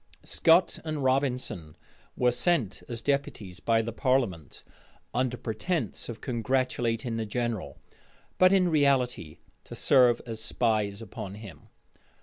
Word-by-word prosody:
Scot 165 +3 +3
and 155 -3 -3
Robinson 130 - -1 0.4
were 125 -1 +3
sent 125 - +1
as 115 -1 -5
deputies 125 -10 -2
by 115 -1 +2
the 115 - -4
parliament, 115 - -1 0.5
under 125 0 0
pretence 120 - -3
of 115 -2 -7
congratulating 120 -2 -1
the 110 - -2
general, 120 -1 -3 0.6
but 185 0 +7
in 185 -2 +4
reality 135 - +1 0.3
to - - -10
serve 125 -3 +4
as 115 -2 -5
spies 110 -3 0
upon 100 -2 -7
him. 105 -2 -12
120 Hz, 125 wpm, -28 LUFS, 110-135 Hz, 0.6 s, but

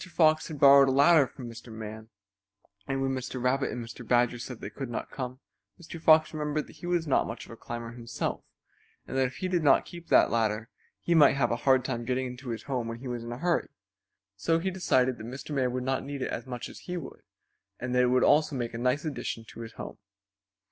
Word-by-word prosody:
Fox 155 -2 +3
had 155 -3 -7
borrowed 140 0 +8
a - - +2
ladder 145 +1 +6
from 125 -2 -9
Mr. 115 0 -10
Man, 110 0 -8 0.8
and 135 0 -1
when 135 - 0
Mr. 130 0 -4
Rabbit 130 +2 +1
and 120 -1 -5
Mr. 115 +2 -10
Badger 120 +1 +2
said 120 0 -7
they - - -7
could 135 -3 -6
not 120 - -5
come 130 -1 -5 0.4
Mr. 165 -1 -9
Fox 155 0 +5
remembered 150 0 -2
that - - -16
he 175 - -7
was 175 -2 +1
not 140 - +2
much 115 0 -6
of - - -13
a - - -8
climber 115 0 -6
himself 115 -1 -4 0.6
and - - -7
that 130 -1 +3
if 125 - -10
he 185 - -3
did 180 -2 +1
not 140 -3 +4
keep 170 -1 -11
that - - +5
ladder 110 0 0 0.3
he 175 - +1
might 150 -4 +6
have 135 -3 +1
a - - +2
hard 130 -1 +5
time 120 -3 -2
getting 130 +2 -1
into 125 +1 -7
his 115 -1 -4
home 125 -4 -2
when 115 0 -5
he 130 +2 -8
was 120 -1 -4
in 120 - -6
a 120 - -5
hurry. 170 +4 0 0.7
So 165 +11 +1
he 190 +3 -1
decided 130 -9 +1
that 110 - -7
Mr. 135 +4 -7
Man 130 -3 +1
would 125 0 -2
not 130 +1 -1
need 140 -1 -4
it - - -3
as - - -5
much 125 -2 -5
as - - -11
he 180 0 -5
would 160 - -8 0.6
and 125 0 -3
that 125 - +4
it 125 - +4
would 125 0 +3
also 150 -1 +4
make 120 -2 -3
a 115 - -5
nice 125 +6 +1
addition 135 -6 -4
to - - -12
his 115 -1 -7
home. - - -8
130 Hz, 245 wpm, -28 LUFS, 120-150 Hz, 0.8 s, borrowed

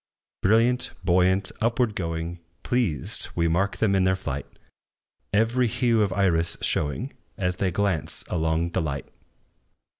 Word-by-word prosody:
Brilliant, 115 +5 +3
buoyant, 95 +2 +3
upward 115 0 +1
going, 85 0 -3 0.2
Pleased, 105 - 0
we 85 0 +2
mark 95 +5 +1
them 105 -3 +2
in 95 -1 +3
their 95 0 +3
flight, 95 - -4 0.8
Every 115 +4 +2
hue 115 -1 +2
of 100 -3 +1
iris 85 -4 +1
showing, 70 -3 -1 0.2
As 90 -1 -1
they 95 - +1
glance 90 -3 -1
along 80 0 0
the - - 0
light. 70 -3 -3
95 Hz, 130 wpm, -25 LUFS, 85-110 Hz, 0.8 s, Brilliant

